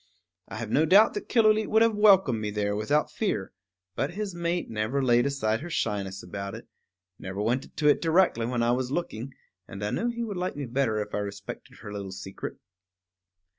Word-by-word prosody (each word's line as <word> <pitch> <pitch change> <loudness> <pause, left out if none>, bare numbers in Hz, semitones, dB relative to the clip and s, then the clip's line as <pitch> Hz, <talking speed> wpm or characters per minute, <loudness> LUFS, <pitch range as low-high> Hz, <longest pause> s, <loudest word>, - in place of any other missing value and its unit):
I - - -8
have 110 -1 -5
no 155 +6 +4
doubt 205 +6 +6
that 415 - -6
Killooleet 215 -2 +4
would 220 +1 +4
have 230 -1 +3
welcomed 195 - +5
me 105 - -2
there 105 0 -1
without 145 +9 +1
fear; 105 - -2 0.4
but 150 +6 -2
his 205 -2 -3
mate 170 0 -2
never 110 +5 -1
laid 120 +1 +4
aside 115 -5 0
her 175 - -6
shyness 100 - -2
about 100 +2 -6
it, - - -11 0.5
never 95 +1 -6
went 120 +6 -1
to 150 - +2
it 145 - +4
directly 165 -9 +3
when 120 -1 0
I 120 - +3
was 125 0 0
looking, 135 -5 -3 0.4
and 100 +1 -6
I 105 - -2
knew 235 - 0
he 235 0 -3
would 205 -5 -4
like 180 +1 -2
me 145 -1 -4
better 120 -3 0
if 105 - -15
I - - 0
respected 100 +6 -7
her 105 -1 -7
little 100 -2 -5
secret. 95 +1 -7
125 Hz, 205 wpm, -27 LUFS, 105-175 Hz, 0.5 s, doubt